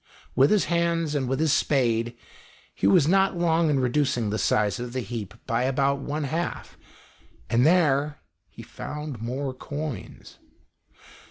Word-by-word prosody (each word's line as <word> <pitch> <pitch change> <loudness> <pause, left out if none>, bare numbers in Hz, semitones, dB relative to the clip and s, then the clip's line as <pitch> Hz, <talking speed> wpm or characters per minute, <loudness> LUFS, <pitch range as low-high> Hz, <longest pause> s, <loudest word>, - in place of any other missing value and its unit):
With 135 +2 +5
his 210 -2 +3
hands, 170 -2 0
and 135 -4 -1
with 135 +1 -1
his 155 -2 +2
spade, 120 -4 +1 0.6
he 95 - 0
was 140 +9 +5
not 195 +1 +3
long 165 -1 +2
in 140 -2 +2
reducing 125 -4 0
the 110 - -1
size 105 +1 +1
of 120 0 -6
the 130 - -2
heap 110 -3 -6
by 115 -1 0
about 140 +1 +1
one 150 +1 -3
half, 160 +5 -4 0.8
and 120 +5 +4
there 150 -4 +2 0.3
he - - -12
found 150 -6 -7
more 130 +3 -3
coins. 145 - -7
140 Hz, 150 wpm, -25 LUFS, 120-155 Hz, 0.8 s, With